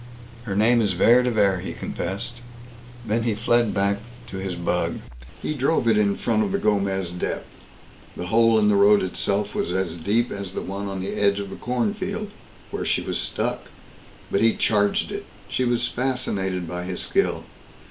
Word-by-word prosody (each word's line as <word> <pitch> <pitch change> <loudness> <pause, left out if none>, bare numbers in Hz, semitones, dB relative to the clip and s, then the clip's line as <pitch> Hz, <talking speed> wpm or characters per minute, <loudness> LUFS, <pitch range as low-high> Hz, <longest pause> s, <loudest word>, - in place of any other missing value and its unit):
"Her 100 -4 -3
name 115 +3 +4
is 100 -4 +2
Vere 115 +7 +5
de 125 - +1
Vere!" 100 -5 +2
he 95 - -5
confessed. 100 +7 -4 0.6
Then 110 +2 0
he 115 -2 0
fled 115 +1 +2
back 100 0 +1 0.3
to 95 - -6
his 95 -1 -3
bug. 85 0 -1 0.5
He - - -1
drove 140 -2 +1
it 115 - +5
in 100 -1 +3
front 110 -3 +1
of 100 -3 0
the - - +1
Gomez 100 -4 0
Dep. 90 - -3 0.7
The 90 - -4
hole 115 +3 +4
in 105 -1 +4
the 105 - +4
road 100 0 +6
itself 100 +2 -1
was - - -1
as 90 -2 -1
deep 105 +8 0
as 100 -1 -6
the - - -2
one 100 +1 -4
on 95 -1 -4
the 95 - -3
edge 100 -1 +2
of 100 -1 -5
the - - -6
cornfield, 200 - -2 0.4
where - - -3
she - - +1
was - - -2
stuck, - - -2 0.7
but 100 - +2
he 115 0 +4
charged 105 -2 +2
it. - - -5 0.2
She 130 - 0
was 120 0 +1
fascinated 95 -9 -2
by 90 +1 -4
his 90 -1 -3
skill. - - +1
105 Hz, 190 wpm, -24 LUFS, 95-115 Hz, 0.7 s, road